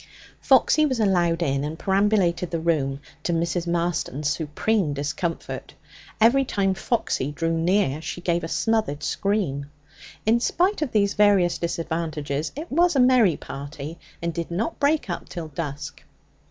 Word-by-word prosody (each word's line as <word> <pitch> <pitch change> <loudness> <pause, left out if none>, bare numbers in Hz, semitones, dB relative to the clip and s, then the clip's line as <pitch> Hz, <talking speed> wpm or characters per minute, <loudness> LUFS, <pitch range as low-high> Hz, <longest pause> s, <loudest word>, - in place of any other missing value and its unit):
Foxy 310 - +4
was 260 -5 +1
allowed 175 -5 +2
in, 140 -2 0
and 155 +2 -4
perambulated 190 -3 +1
the 165 - -2
room, 145 -5 0 0.2
to - - -2
Mrs. 170 +1 -1
Marston's 170 -4 -1
supreme 160 +3 0
discomfort; 155 +4 -4 0.4
every 235 +5 +5
time 195 -6 0
Foxy 190 - -1
drew 165 +3 -1
near 165 -3 +1
she 160 - -5
gave 175 -1 0
a - - -2
smothered 215 -7 0
scream. 185 -9 -1 0.6
In 225 +2 +4
spite 360 - +1
of 295 -6 -1
these 200 -2 +2
various 200 -4 +3
disadvantages, 160 -3 -2
it 310 +4 -7
was 345 +3 +3
a - - +3
merry 250 - +5
party, 145 +3 -7 0.2
and 170 0 -1
did 170 0 -4
not 205 - -2
break 290 -1 +2
up 175 - -5
till 165 -3 -6
dusk. 145 -1 -6
170 Hz, 150 wpm, -24 LUFS, 155-210 Hz, 0.6 s, every